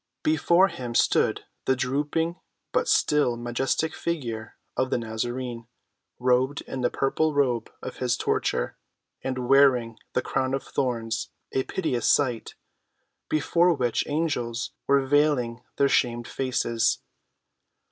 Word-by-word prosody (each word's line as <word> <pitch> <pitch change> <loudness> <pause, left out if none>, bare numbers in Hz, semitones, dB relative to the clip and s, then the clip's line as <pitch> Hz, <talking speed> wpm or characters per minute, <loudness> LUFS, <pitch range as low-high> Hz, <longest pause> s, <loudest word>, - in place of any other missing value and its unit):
Before 170 +4 +4
him 120 -7 -6
stood - - +3 0.2
the 130 - +3
drooping 145 +6 -1 0.3
but - - +1
still 145 -5 +3
majestic 120 +6 -1
figure 120 -10 -4 0.2
of 130 0 0
the - - +1
Nazarene, 120 +1 -4 0.5
robed 130 +3 +2
in 130 - -6
the 120 - +2
purple 150 +3 0
robe 125 -5 +1
of - - -6
his 125 -1 0
torture - - -1 0.4
and 130 -2 -3
wearing 125 -5 +4
the 125 - +1
crown 130 0 0
of 135 - -4
thorns, 115 -4 -2 0.2
a 135 - +1
piteous 130 -11 -1
sight, 125 -6 0 0.7
before 170 +3 +3
which 125 -4 0
angels 125 -6 -1 0.2
were 140 -1 +4
vailing 135 -4 +2 0.2
their 140 - +4
shamed 120 -3 +1
faces. 120 -3 0
130 Hz, 125 wpm, -26 LUFS, 120-145 Hz, 0.7 s, Before